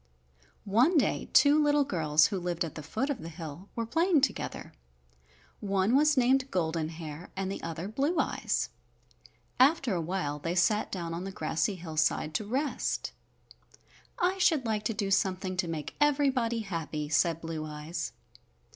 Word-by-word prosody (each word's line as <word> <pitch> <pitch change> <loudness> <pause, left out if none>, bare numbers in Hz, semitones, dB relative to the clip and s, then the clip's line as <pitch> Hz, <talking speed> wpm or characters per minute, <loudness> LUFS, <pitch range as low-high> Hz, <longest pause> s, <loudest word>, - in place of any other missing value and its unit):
One 245 - +4
day 285 - +1
two 295 +1 +6
little 295 0 +4
girls 155 - +3
who 190 - -1
lived 175 -1 -2
at 160 - -7
the 155 - -7
foot 220 - -2
of 260 - -4
the 165 - -7
hill 165 +2 -9
were 230 - -2
playing 330 +5 +2
together. 260 -6 -2 0.9
One 195 +3 +1
was 300 0 +4
named 260 +2 +3
Golden 160 -4 -1
Hair 160 0 -8
and 195 0 -2
the - - -5
other 165 +2 -5
Blue 280 - 0
Eyes. - - 0 0.9
After 275 - +4
a 175 - 0
while 160 -4 -2
they 165 +4 -2
sat 210 +4 +2
down 170 -3 -4
on 170 +2 -4
the 195 - -5
grassy 160 0 -1
hillside 155 -2 -1
to 205 - -1
rest. 270 +6 -1 1.1
"I 370 +2 +1
should 320 -7 +3
like 215 -2 -1
to 225 - 0
do 200 -2 -2
something 185 -1 +1
to 180 -1 0
make 160 -3 -5
everybody 270 -6 +2
happy," 160 -6 -4
said 165 +2 +2
Blue 165 -1 -5
Eyes. 155 +2 -5
190 Hz, 165 wpm, -29 LUFS, 165-260 Hz, 1.1 s, two